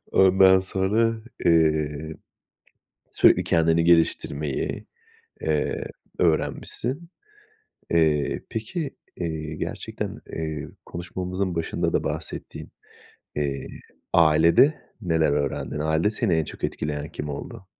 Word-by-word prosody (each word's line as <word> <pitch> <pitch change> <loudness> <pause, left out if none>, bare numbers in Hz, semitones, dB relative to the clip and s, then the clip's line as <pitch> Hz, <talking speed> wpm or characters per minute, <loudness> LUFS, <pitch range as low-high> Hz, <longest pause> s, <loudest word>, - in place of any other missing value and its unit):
ondan 95 0 +6
sonra, 105 +4 0 0.2
eee, 80 -2 +2 1.0
sürekli - - +5
kendini 80 0 +3
geliştirmeyi, 75 -4 +1 0.6
eee, 75 -2 0 0.3
öğrenmişsin. 125 - -1 0.8
Eee, 80 -3 +2
peki, 135 +7 -3 0.3
eee, 80 -2 -4
gerçekten, - - -5
eee, 80 -2 -4 0.2
konuşmamızın 90 +1 -3
başında 80 -1 -1
da - - +1
bahsettiğin, - - -6 0.7
eee, 70 -2 -2 0.5
ailede 85 - +6 0.3
neler 80 -6 +2
öğrendin? 70 +1 -2
Ailede 80 +6 +1
seni 110 -4 +1
en 80 -1 +1
çok - - -8
etkileyen 75 0 -3
kim 75 - -5
oldu? 75 +6 -7
80 Hz, 95 wpm, -25 LUFS, 75-95 Hz, 1.0 s, ondan